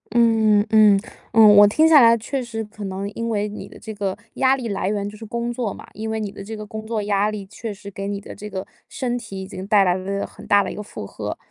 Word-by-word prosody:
嗯 220 -3 +4
嗯 - - -3
嗯， 210 -2 +6 0.3
嗯。 215 -2 +8
我 205 0 +9
听 310 +10 +4
下 310 -3 +8
来 230 -1 +6
确 260 +4 -3
实 225 -2 -5
可 210 0 -10
能 195 +1 -4
因 230 +2 -4
为 210 -2 0
你 210 - -8
的 - - -14
这 220 - -7
个 200 -2 -3 0.2
压 265 0 +3
力 255 -3 -5
来 195 -2 -2
源 200 -1 -2
就 205 - -8
是 220 - -11
工 235 +2 -3
作 235 -4 -2
嘛， - - -11
因 220 +1 -5
为 220 0 -2
你 210 -2 -4
的 200 - -9
这 220 +3 -7
个 215 - -7
工 215 +1 -7
作 220 -2 -2
压 205 0 +1
力 210 -2 -5
确 210 +3 -7
实 200 0 -11
给 195 +1 -5
你 200 0 -3
的 - - -10
这 210 - -8
个 190 -1 -5 0.2
身 250 -4 -3
体 220 -5 -7
已 190 - -7
经 190 0 -8
带 205 -2 +5
来 180 -2 +3
了 195 +2 -3
很 - - -13
大 205 0 +5
的 - - -4
一 - - -7
个 - - -5
负 155 - -8
荷。 - - -6
210 Hz, 300 characters per minute, -22 LUFS, 200-225 Hz, 0.3 s, 我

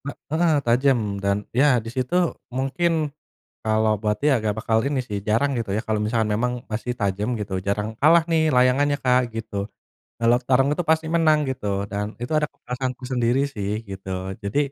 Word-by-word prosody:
He - - -3 0.2
heeh, 165 0 +3
tajem 125 +2 +3 0.2
dan 100 0 +2 0.2
ya 130 +1 +4
di - - -5
situ 130 +4 -2 0.4
mungkin 140 +6 0 0.7
kalau 110 0 +2
buat 105 -1 0
dia 145 -2 +3
nggak 105 -1 -1
bakal 110 0 +1
ini 140 -1 0
sih 105 -2 -2
jarang 115 +7 +2
gitu 115 -4 -3
ya - - 0
kalau 110 -1 0
misalkan 110 0 0
memang 125 +3 0 0.2
masih 115 +3 -2
tajam 100 +1 -1
gitu 100 -2 -4
jarang, 105 +1 0
kalah 165 +3 +6
nih 160 -1 +3
layangannya 130 +3 +3
Kak, 125 -1 +2
gitu. 115 -1 -6 0.6
Kalau 115 +1 +4
tarung 135 +1 +4
itu 175 - -1
pasti 160 0 +2
menang 155 -2 +4
gitu 130 -5 -4 0.2
dan 100 +1 -2 0.2
itu 120 - -4
ada 150 -1 0
kepuasanku 125 +1 -5
sendiri 120 +1 +2
sih, 100 -1 -3 0.2
gitu. 95 0 -7 0.3
Jadi 100 +7 -2
125 Hz, 180 wpm, -23 LUFS, 110-140 Hz, 0.7 s, kalah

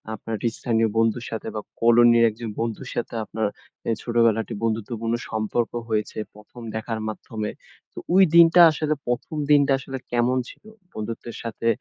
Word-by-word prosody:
আপনার 110 +2 -5 0.2
স্থানীয় 115 -1 0
বন্ধুর 115 +1 +1
সাথে 110 - -5
বা, 105 - -2 0.2
কলোনির 120 0 +6
একজন 110 +1 -7
বন্ধুর 115 -2 -3
সাথে 120 - -3
আপনার 110 -1 -2 0.4
এ - - +3
ছোটবেলাটি 115 -2 +1
বন্ধুত্বপূর্ণ 115 +1 -2 0.2
সম্পর্ক 110 +2 -1 0.2
হয়েছে 105 -1 -2 0.2
১ম 105 +3 -14
দেখার 110 0 -3
মাধ্যমে। 110 0 -5 0.4
তো - - -33 0.2
ওই 190 +1 +7
দিনটা 170 +1 +8
আসলে 155 0 -1
১ম 120 +5 -2 0.2
দিনটা 140 -1 +5
আসলে 135 0 -6
কেমন 120 +1 +2
ছিল? - - -15 0.3
বন্ধুত্বের 115 +2 -6
সাথে 115 0 -4
115 Hz, 145 wpm, -24 LUFS, 110-120 Hz, 0.4 s, দিনটা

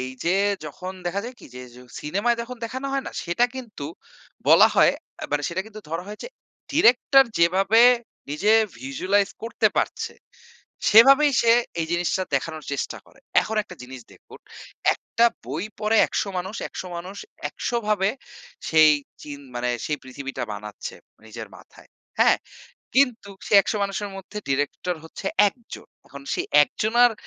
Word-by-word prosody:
এই 130 - -3 0.2
যে 175 +3 +2 0.3
যখন 185 +5 -7
দেখা 195 +3 -1
যায় 250 +1 -8
কি - - -12
যে, 125 - -8
য - - -13 0.2
সিনেমায় 200 +10 0
যখন 250 +1 -8
দেখানো 260 +4 -5
হয় 275 -1 -1
না? - - -6
সেটা 175 +8 +2
কিন্তু, 230 - -7 0.6
বলা - - +8
হয়, - - +6 0.3
আ - - -3
মানে 145 0 +1
সেটা 180 +3 -2
কিন্তু 215 -1 -11
ধরা 165 +2 -3
হয় 210 - -8
যে 485 - -7 0.4
ডিরেক্টর 270 -1 +5
যেভাবে 190 +6 +4 0.5
নিজে 195 +9 +2 0.3
ভিজুয়ালাইজ 185 +10 0
করতে 230 - +1
পারছে, - - -1 0.8
সেভাবেই 275 +6 +7
সে 230 - +5 0.3
এই 160 - -1
জিনিসটা 175 +2 0
দেখানোর 155 +2 -3
চেষ্টা 140 - -3
করে। - - -22 0.2
এখন 220 - -4
একটা 180 -3 -13
জিনিস 130 0 -10
দেখুন, - - -16 0.6
একটা 235 - 0 0.2
বই 150 +8 -3 0.2
পড়ে 215 +1 +2
১০০ - - -2
মানুষ, 190 +5 -5
১০০ - - -7
মানুষ 185 +4 -8 0.3
১০০ 240 - -3
ভাবে 200 -1 +2 0.6
সেই 155 -1 +6 0.3
চিন 145 -1 -8 0.2
মানে, 125 0 -1 0.2
সেই 150 - -1
পৃথিবীটা 135 +1 -6
বানাচ্ছে 105 0 -7 0.3
নিজের - - -8
মাথায়। - - -18 0.3
হ্যাঁ? - - +5 0.6
কিন্তু 250 -7 +2 0.2
সেই 205 - +6
১০০ 215 - -2
মানুষের 200 +1 -3
মধ্যে 195 +2 -8
ডিরেক্টর 145 +6 -1
হচ্ছে 160 - -9 0.2
১ - - -13 0.2
জন। - - -13 0.2
এখন 140 0 -11
সেই - - -2 0.2
১ - - 0
জনার 240 +2 +4
190 Hz, 160 wpm, -24 LUFS, 150-230 Hz, 0.8 s, বলা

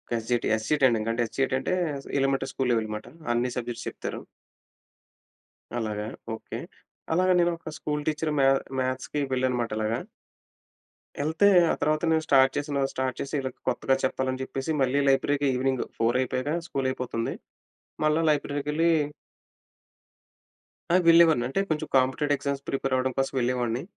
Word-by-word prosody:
S 115 -1 -4
G 125 - +4
T, - - 0
S 110 0 -1
G - - +2
T - - -4
training 115 -4 +3
అంటే 115 +1 -1
S 110 - -11
G 135 - +3
T - - +2
అంటే 135 - -2 0.5
elementary 135 0 +1
school 130 -2 -1
level 115 -2 +1
అన్నమాట. 105 0 -5 0.3
అన్ని 120 +1 +1
subjects 120 -1 -4
చెప్తారు. - - -5 1.6
అలాగా! 105 -2 -3 0.3
ఓకే. - - -8 0.6
అలాగా 185 +2 +3
నేను 175 0 +3
ఒక 160 -1 -8
స్కూల్ 150 -1 -2
టీచర్ 155 0 0
మ్యా 135 0 +5 0.3
మ్యాథ్స్‌కి 130 +3 -2
వెళ్ళాననమాట 125 -2 0
అలాగా. 110 +2 -1 1.2
ఎళ్తే, 160 +7 +3 0.2
ఆ - - +2
తర్వాత 155 +2 +1
నేను 160 0 +2
స్టార్ట్ 135 -1 +5
చేసి, 145 +1 -3 0.2
స్టార్ట్ 130 -1 -2
చేసి 140 - -6
వీళ్ళకి 130 -2 -4
కొత్తగా 130 +2 +1
చెప్పాలని 130 0 -1
చెప్పేసి 135 +3 -4
మళ్ళీ 135 +2 +2
లైబ్రరీకి 140 +1 +2
ఈవెనింగ్ 130 0 0
4:00 115 +2 +2
అయిపోయాక 130 +2 -2 0.2
స్కూల్ 135 -4 -1
అయిపోతుంది. 125 -3 -3 0.7
మళ్ళ 155 0 +3
లైబ్రరీకెళ్ళీ... 150 +2 +1 2.0
ఆ! - - +6
వెళ్ళేవాడిని. 165 -7 +6
అంటే 135 - -1
కొంచెం 155 -1 -1
కాంపిటేటివ్ 140 +3 +1
ఎగ్జామ్స్ 140 0 -3
ప్రిపేరవ్వడం 130 -1 0
కోసం 135 - 0
వెళ్ళేవాడిని. 120 0 0
130 Hz, 150 wpm, -26 LUFS, 125-145 Hz, 2.0 s, ఆ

